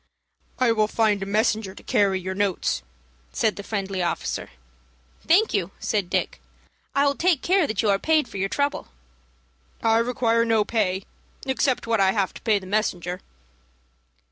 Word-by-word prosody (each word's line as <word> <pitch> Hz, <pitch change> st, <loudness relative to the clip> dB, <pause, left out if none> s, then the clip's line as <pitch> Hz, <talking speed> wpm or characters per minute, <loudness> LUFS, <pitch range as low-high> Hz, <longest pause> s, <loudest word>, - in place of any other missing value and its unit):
"I 250 Hz, -2 st, +3 dB
will 215 Hz, -1 st, +2 dB
find 215 Hz, -2 st, +1 dB
a 195 Hz, -, -3 dB
messenger 215 Hz, -1 st, 0 dB
to -, -, -13 dB
carry 195 Hz, -2 st, +2 dB
your 185 Hz, +1 st, -4 dB
notes," 190 Hz, -, 0 dB, 0.5 s
said 215 Hz, -, +1 dB
the -, -, -6 dB
friendly 195 Hz, -2 st, -3 dB
officer. 175 Hz, -, -2 dB, 0.8 s
"Thank 390 Hz, +7 st, +4 dB
you," 195 Hz, -4 st, 0 dB
said 200 Hz, -4 st, -1 dB
Dick. -, -, -1 dB, 0.5 s
"I 280 Hz, +1 st, +4 dB
will 280 Hz, -, +3 dB
take 335 Hz, -1 st, +1 dB
care 370 Hz, -3 st, +3 dB
that 215 Hz, 0 st, -1 dB
you 215 Hz, -, +2 dB
are 195 Hz, -, +2 dB
paid 315 Hz, -1 st, +2 dB
for -, -, -8 dB
your 195 Hz, +1 st, -1 dB
trouble." 285 Hz, +5 st, -1 dB, 1.0 s
"I 225 Hz, 0 st, +4 dB
require 230 Hz, -1 st, +1 dB
no 225 Hz, -2 st, +2 dB
pay 195 Hz, -4 st, 0 dB, 0.4 s
except 265 Hz, -1 st, 0 dB
what 225 Hz, -3 st, +1 dB
I 190 Hz, 0 st, +4 dB
have 200 Hz, -3 st, 0 dB
to -, -, -11 dB
pay 220 Hz, -3 st, +2 dB
the 190 Hz, -, -7 dB
messenger." 185 Hz, -3 st, -1 dB
215 Hz, 170 wpm, -24 LUFS, 195-235 Hz, 1.0 s, Thank